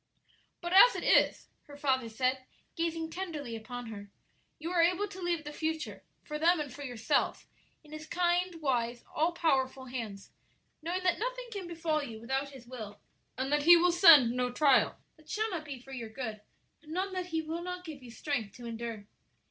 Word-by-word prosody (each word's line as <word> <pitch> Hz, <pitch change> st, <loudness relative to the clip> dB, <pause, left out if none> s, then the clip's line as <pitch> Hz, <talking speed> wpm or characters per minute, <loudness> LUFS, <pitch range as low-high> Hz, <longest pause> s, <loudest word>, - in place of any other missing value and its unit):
"But 345 Hz, 0 st, -3 dB
as 445 Hz, +6 st, +9 dB
it -, -, -4 dB
is," -, -, +3 dB, 0.2 s
her 285 Hz, -1 st, -11 dB
father 260 Hz, -5 st, +1 dB
said, 255 Hz, +3 st, -1 dB, 0.3 s
gazing 330 Hz, -1 st, -2 dB
tenderly 310 Hz, -10 st, -5 dB
upon 245 Hz, +2 st, -7 dB
her, 205 Hz, -1 st, -9 dB, 0.5 s
"you 330 Hz, +3 st, -5 dB
are 350 Hz, -2 st, +3 dB
able 360 Hz, +4 st, +2 dB
to 380 Hz, -1 st, -10 dB
leave 345 Hz, -3 st, -1 dB
the 295 Hz, 0 st, -7 dB
future, 320 Hz, +1 st, -3 dB, 0.2 s
for 300 Hz, -1 st, -5 dB
them 340 Hz, +2 st, +4 dB
and 285 Hz, -4 st, -4 dB
for 285 Hz, -, -10 dB
yourself, 245 Hz, -5 st, -1 dB, 0.4 s
in 300 Hz, -, -17 dB
His 310 Hz, 0 st, -8 dB
kind, 355 Hz, 0 st, +1 dB
wise, 240 Hz, -3 st, 0 dB
all 325 Hz, +3 st, +2 dB
powerful 270 Hz, -6 st, 0 dB
hands, 225 Hz, -6 st, -6 dB, 0.5 s
knowing 350 Hz, +4 st, -2 dB
that 360 Hz, -1 st, +2 dB
nothing -, -, -3 dB
can 395 Hz, -5 st, -5 dB
befall 325 Hz, -2 st, -1 dB
you 230 Hz, -6 st, -7 dB
without 265 Hz, +4 st, -2 dB
His 265 Hz, -3 st, -13 dB
will, 220 Hz, -5 st, -8 dB, 0.4 s
and 265 Hz, +2 st, -2 dB
that 295 Hz, -, +3 dB
He 340 Hz, +3 st, +9 dB
will 355 Hz, +1 st, +4 dB
send 330 Hz, -9 st, +8 dB
no 250 Hz, 0 st, -1 dB
trial 275 Hz, +1 st, +4 dB, 0.2 s
that 310 Hz, -1 st, -21 dB
shall 435 Hz, 0 st, -1 dB
not 330 Hz, -4 st, -4 dB
be 280 Hz, -4 st, -7 dB
for 270 Hz, +2 st, -14 dB
your 240 Hz, -4 st, -6 dB
good, 220 Hz, -3 st, -5 dB, 0.4 s
and 310 Hz, 0 st, -10 dB
none 375 Hz, +2 st, -2 dB
that 365 Hz, -1 st, -3 dB
He 325 Hz, -2 st, -2 dB
will 325 Hz, +2 st, -4 dB
not 360 Hz, 0 st, -6 dB
give 305 Hz, -4 st, -8 dB
you 250 Hz, -, -11 dB
strength 235 Hz, -4 st, -3 dB
to 245 Hz, -, -10 dB
endure?" 230 Hz, -2 st, -5 dB
300 Hz, 195 wpm, -31 LUFS, 250-345 Hz, 0.5 s, as